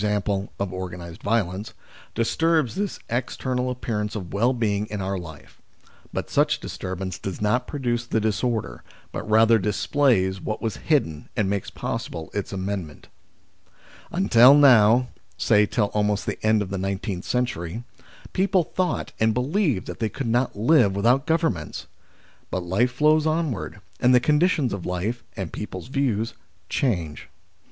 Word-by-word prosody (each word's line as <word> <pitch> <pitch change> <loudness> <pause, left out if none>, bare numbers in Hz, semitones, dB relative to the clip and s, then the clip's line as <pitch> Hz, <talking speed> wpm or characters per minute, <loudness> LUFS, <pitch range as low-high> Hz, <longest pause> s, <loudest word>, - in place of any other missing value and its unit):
e. - - +2 0.5
of 100 -2 -2
organised 90 -2 -7
violence, 100 -2 -1 0.4
disturbs 155 +4 +1
this 200 +1 -2
external 125 +1 -2
appearance 110 -4 -3
of 90 -6 -6
well 115 +5 +3
being 105 -4 0
in 105 -1 -5
our 95 0 -2
life, 80 -6 -10 0.5
but - - -3
such - - +2
disturbance 95 0 -5
does 95 -2 -5
not 105 +4 +1
pro 145 - -5
duce 120 -3 -1
the 115 - +1
disorder, 110 - -1 0.3
but - - -6
rather 115 +1 +5
displays 105 -3 +1
what 110 - -3
was 115 -3 -3
hidden 80 - 0
and 105 -4 +2
makes 100 -2 -2
possible 80 -1 -5
its 100 -1 -3
amendment. 95 -5 -5 1.0
Until 115 +7 +6
now, 125 -3 +6 0.3
say 105 +4 +4
till 105 -3 0
almost 105 -1 0
the - - -4
end 110 -1 +3
of 95 - -8
the 100 - -2
nineteenth 95 0 -3
century, 120 -4 -2 0.5
people 190 -1 +2
thought 180 +2 -2
and 110 0 +2
believed 140 - 0
that - - -7
they 110 - 0
could 135 +3 -5
not 120 +2 +1
live 110 -4 +4
without 120 +7 +2
Governments. 160 - -1 0.6
But 95 - -2
life 100 +8 +1
flows 150 +4 +3
onward, 155 - -2 0.2
and 125 +1 +5
the - - +7
conditions 150 - +2
of 100 -3 -5
life, 100 +7 -3
and 95 -4 -5
people's 105 +1 -6
views, 120 -5 0 0.4
change. 85 - -1
110 Hz, 150 wpm, -24 LUFS, 95-125 Hz, 1.0 s, the